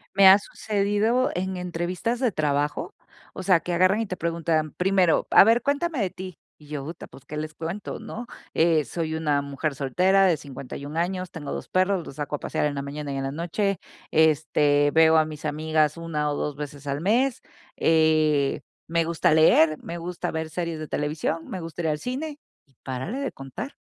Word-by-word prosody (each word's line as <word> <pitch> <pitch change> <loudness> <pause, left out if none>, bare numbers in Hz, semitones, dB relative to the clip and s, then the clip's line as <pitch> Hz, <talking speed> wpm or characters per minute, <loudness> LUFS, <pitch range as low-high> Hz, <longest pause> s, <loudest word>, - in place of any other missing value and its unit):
Me 195 -1 +8
ha 190 +1 +10
sucedido 210 +5 0
en 190 +1 -2
entrevistas 180 +6 -2
de 250 -3 +2
trabajo, 145 -3 -1 0.4
o - - -6
sea, 185 -2 +4
que 175 - -4
agarran, 185 +5 +3
y 225 - -3
te 185 - -5
preguntan, 165 -2 0
primero, 185 -2 +2
a - - +8
ver, 230 +3 +4
cuéntame 285 +3 -1
de 200 -4 +1
ti. 185 -1 -9 0.2
Y 150 - -18
yo: 145 -2 -5
¡Uta!, 160 +4 -8
pus, 135 - -16
¿qué 150 - -7
les 155 0 -4
cuento, 165 +6 -5
no?" 240 +2 -7 0.3
Eh, 160 -2 +3
soy 160 -2 -3
una 150 -3 +1
mujer 140 +1 -3
soltera, 185 +8 +3
de 180 -3 +4
51 140 +1 -7
años, 185 +1 -2
tengo 150 -4 -7
2 - - -6
perros, 185 -1 +1
los - - -9
saco 145 0 -3
a - - -6
pasear - - -1
en 145 -1 -1
la 140 - -2
mañana 140 0 -5
y - - -3
en 135 - -2
la 135 - -2
noche. 175 +5 -1 0.3
Este, 150 -2 +3
veo 160 0 +6
a 155 - +4
mis 155 0 -8
amigas 155 0 +1
una 155 -3 -2
o - - -2
dos 145 0 -3
veces 145 -1 -8
al 140 +1 -2
mes, 235 +7 +2 0.4
eh, 155 -3 +3 0.3
me 165 0 +1
gusta 170 +1 +1
leer, 155 0 +5
me 170 - -5
gusta 175 +1 -4
ver 160 0 -3
series 170 0 -3
de 155 - -6
televisión, 155 +3 -2
me 185 - -5
gusta 165 +1 -6
ir - - 0
el 150 -1 0
cine, 285 - -4 0.3
y 135 -3 -33
párale 135 - -4
de 275 - -2
contar. 155 - -7
160 Hz, 200 wpm, -25 LUFS, 150-185 Hz, 0.4 s, ha